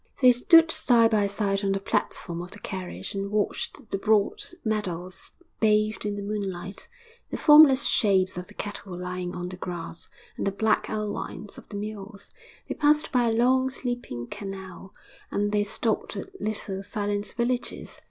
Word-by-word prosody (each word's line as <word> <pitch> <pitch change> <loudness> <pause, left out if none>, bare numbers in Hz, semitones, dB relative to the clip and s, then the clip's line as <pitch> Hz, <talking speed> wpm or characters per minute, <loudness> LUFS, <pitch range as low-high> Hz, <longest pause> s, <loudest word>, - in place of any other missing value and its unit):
They 255 -2 +8
stood 320 +7 +6
side 230 -5 +4
by 210 -2 +3
side 200 0 -1
on 195 0 +2
the 195 - -1
platform 170 -3 -2
of 175 - -8
the 200 - -11
carriage 185 -3 -5
and 200 0 -3
watched 215 +5 -2
the 195 - -1
broad 210 -1 +2 0.2
meadows 185 -4 -3 0.3
bathed 215 -1 +2
in 205 - -2
moonlight, 195 -2 -4 0.4
the - - -3
formless 295 -3 +8
shapes 190 -4 +3
of 180 0 -6
the 210 - -15
cattle 200 -3 -6
lying 180 0 -4
on 175 0 -4
the 185 - -8
grass, 175 -2 -5 0.3
and - - -1
the - - +2
black 215 +2 +1
outlines 210 -1 -4
of - - -18
the 205 - -5
mills; 205 -1 -7 0.4
they - - -2
passed 300 0 +2
by 245 -2 +3
a - - +1
long, 255 +3 +3
sleeping 245 - -4
canal, 190 +2 -8 0.4
and 205 0 0
they 210 0 +2
stopped 220 +2 -2
at 385 0 -8
little, 200 -2 -3
silent 205 0 -3
villages. 245 +1 -2
205 Hz, 165 wpm, -26 LUFS, 190-225 Hz, 0.4 s, They